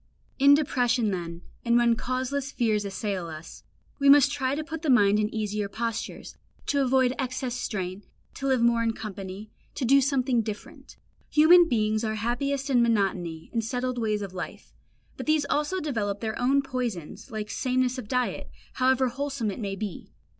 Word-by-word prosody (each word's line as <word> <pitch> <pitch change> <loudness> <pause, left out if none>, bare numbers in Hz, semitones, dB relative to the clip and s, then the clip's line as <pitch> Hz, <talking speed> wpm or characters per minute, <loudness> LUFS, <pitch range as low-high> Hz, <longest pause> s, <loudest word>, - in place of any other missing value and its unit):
In 280 +1 +7
depression 245 -6 +1
then, 170 -2 -5 0.2
and 235 0 +3
when 235 -1 +4
causeless 260 +3 -2
fears 215 -5 0
assail 195 -2 -3
us, 155 0 -10 0.4
we 280 0 +4
must 285 0 +7
try 265 -1 -1
to 310 - -3
put 320 0 -6
the 315 - -2
mind 210 -5 +5
in 210 +1 0
easier 210 -2 -2
postures, 230 +1 -4 0.3
to 280 - +1
avoid 260 -1 +3
excess 255 -1 -2
and 250 - -4
strain, 190 -2 -4 0.3
to 275 - -4
live 260 -3 +2
more 235 0 +3
in 230 -1 +1
company, 200 -1 -7 0.2
to 265 - -2
do 275 +3 +5
something 260 -3 +1
different. 215 -1 -8 0.3
Human 335 +3 +6
beings 215 -1 +1
are 220 -1 -1
happiest 265 +5 -1
in 245 -2 +4
monotony 190 -8 0
and 230 -1 0
settled 250 +2 -2
ways 215 -2 -1
of 195 -2 -7
life; 180 - -7 0.4
but - - -6
these 310 -2 +3
also 300 +6 0
develop 215 - -2
their 220 0 -4
own 275 +3 +3
poisons, 245 - -5
like 215 -2 -5
sameness 255 0 0
of 230 - -8
diet, 250 +1 -1 0.2
however 260 0 +2
wholesome 270 -3 -3
it 195 - -7
may 200 -3 -3
be. 200 -2 -6
240 Hz, 175 wpm, -26 LUFS, 210-265 Hz, 0.4 s, In